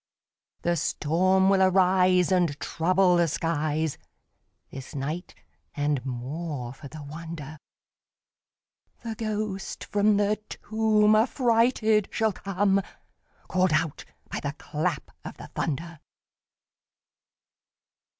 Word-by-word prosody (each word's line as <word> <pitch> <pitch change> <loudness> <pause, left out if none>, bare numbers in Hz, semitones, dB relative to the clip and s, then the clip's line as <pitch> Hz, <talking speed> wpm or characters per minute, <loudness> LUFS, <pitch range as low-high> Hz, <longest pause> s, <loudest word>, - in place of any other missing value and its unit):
The 170 0 +1
storm 185 +5 +2
will 195 -1 +4
arise, 185 -1 +4
And 175 -6 +2
trouble 180 +5 +2
the 170 -1 +3
skies 155 -1 -1 0.7
This 135 +1 -9
night; 150 +6 -4 0.4
and, 145 -3 0
more 130 +1 -5
for 140 +1 -11
the 155 +1 -9
wonder, 155 0 -8 1.4
The 230 -1 -3
ghost 215 -3 -4
from 205 0 +2
the 205 +1 +2
tomb 215 -1 +2
Affrighted 225 -2 +3
shall 220 -2 +1
come, 195 +1 +1 0.7
Call'd 185 -2 +2
out 160 -2 0 0.2
by - - -4
the - - -3
clap - - -3
of - - -8
the - - -11
thunder. 165 +2 -3
180 Hz, 100 wpm, -26 LUFS, 155-205 Hz, 1.4 s, will